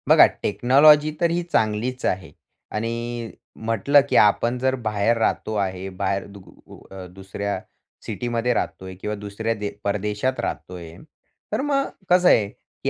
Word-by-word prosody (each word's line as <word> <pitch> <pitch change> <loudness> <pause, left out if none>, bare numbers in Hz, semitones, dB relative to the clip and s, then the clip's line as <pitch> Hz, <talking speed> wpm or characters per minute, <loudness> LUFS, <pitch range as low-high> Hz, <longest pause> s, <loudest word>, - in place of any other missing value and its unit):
बघा, - - +9 0.2
टेक्नॉलॉजी 145 +8 +5
तर 170 - +3
ही 175 +1 -1
चांगलीच 110 +4 0
आहे. 90 -5 -2 0.4
आणि 115 +1 -4 0.3
म्हटलं 115 +6 +4
की - - 0
आपण 115 +4 +4
जर 130 +1 +1
बाहेर 110 -1 0
राहतो 110 -1 -1
आहे. 95 -2 -2
बाहेर 95 +1 -2
दुग 100 -2 -14 0.2
ऊ - - -13
अ, 95 -1 -8
दुसऱ्या 95 +1 -4 0.5
सिटीमध्ये 120 0 -1
राहतोय 95 -4 -4
किंवा 105 0 -3
दुसऱ्या 105 +2 -3
दे 105 -1 -4
परदेशात 105 +5 -1
राहतोय. 85 -3 -5 0.6
तर 215 - 0
मग 275 -1 0 0.2
कसं 180 0 +5
आहे 105 - +4 0.4
की - - +1
110 Hz, 145 wpm, -23 LUFS, 100-125 Hz, 0.6 s, बघा